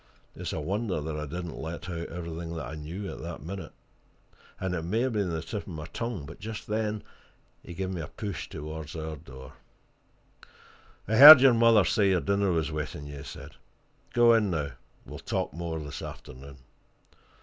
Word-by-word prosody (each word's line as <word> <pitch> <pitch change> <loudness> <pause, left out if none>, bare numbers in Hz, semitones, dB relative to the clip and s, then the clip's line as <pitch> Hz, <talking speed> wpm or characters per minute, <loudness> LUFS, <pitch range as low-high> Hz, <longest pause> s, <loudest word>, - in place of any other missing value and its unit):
It's - - -5
a - - -3
wonder 95 +3 -2
that 75 +1 -4
I 75 0 -4
didn't 85 +2 -6
let 80 +2 -6
out 85 -2 -5
everything 85 -1 -6
that 80 - -4
I 65 - -7
knew 80 +6 -6
at - - -9
that - - -7
minute. 90 -1 -7 0.9
And 95 -1 -2
it 85 - -2
may 95 +8 -1
have 130 -1 0
been 100 -4 0
on 85 - -2
the 80 - -4
tip 105 +3 -4
of - - -20
my 80 -5 -6
tongue, 115 -10 -4
but 75 0 -11
just 110 0 -6
then 105 -1 -2 0.6
he 85 - -10
gave 95 +1 -3
me 90 -3 -4
a 80 - -6
push 100 -2 -6
towards 75 0 -7
our 80 -1 -4
door. 65 -2 -12 1.5
"I 110 +2 +1
heard 145 +1 +13
your 130 -1 +6
mother 115 -4 +5
say 100 +2 +3
your 95 -2 +3
dinner 100 0 +1
was 80 -3 0
waiting 75 -1 -5
you," 70 0 -8
he 70 - -8
said. - - -10 0.5
"Go 120 -1 +6
in, 110 -3 +3
now; 75 -5 -2 0.3
we'll - - -9
talk - - -3
more 85 0 -4
this 75 -2 -7
afternoon." 70 +1 -10
85 Hz, 195 wpm, -28 LUFS, 75-105 Hz, 1.5 s, heard